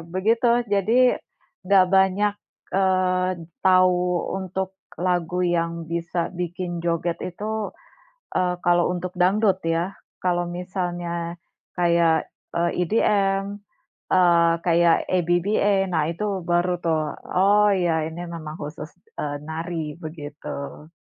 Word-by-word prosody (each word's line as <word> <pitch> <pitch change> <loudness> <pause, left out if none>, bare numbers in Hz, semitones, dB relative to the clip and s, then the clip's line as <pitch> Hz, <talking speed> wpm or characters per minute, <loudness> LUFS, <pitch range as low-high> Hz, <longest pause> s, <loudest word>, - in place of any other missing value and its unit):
begitu, 225 +6 +2 0.3
jadi 210 +5 +3 0.7
enggak 190 -1 +5
banyak, 190 +2 +3 0.4
eee, 185 -1 +2 0.4
tahu 185 -1 +5 0.4
untuk 190 0 -3 0.4
lagu 180 0 0 0.2
yang 165 0 0 0.2
bisa 170 +1 -1 0.2
bikin 180 +1 -3
joget 170 0 0
itu, 210 +5 -5 0.8
eee, 180 -1 +1
kalau 175 0 +4
untuk 180 +1 -5
dangdut, 195 +1 +3 0.2
ya. 165 +1 +1 0.4
Kalau 175 -1 +1 0.2
misalnya 175 -2 -3 0.6
kayak, 170 -2 +3 0.4
eee, 170 0 +2 0.2
EDM, 195 0 +2 0.7
eee, 170 -2 +5
kayak 170 -1 +4
ABBA, 190 +2 +2
nah, 160 -3 +2
itu 170 +5 -3 0.3
baru 175 +1 +2
tuh, 160 -2 +2 0.4
"Oh, 205 +1 +5 0.2
ya, 165 -2 +2
ini 165 +2 -7
memang 155 -2 -7
khusus, 150 +1 -6 0.3
eee, 145 -1 -2
nari", 165 +1 -4
begitu. 150 -2 -7
175 Hz, 110 wpm, -23 LUFS, 170-190 Hz, 0.8 s, enggak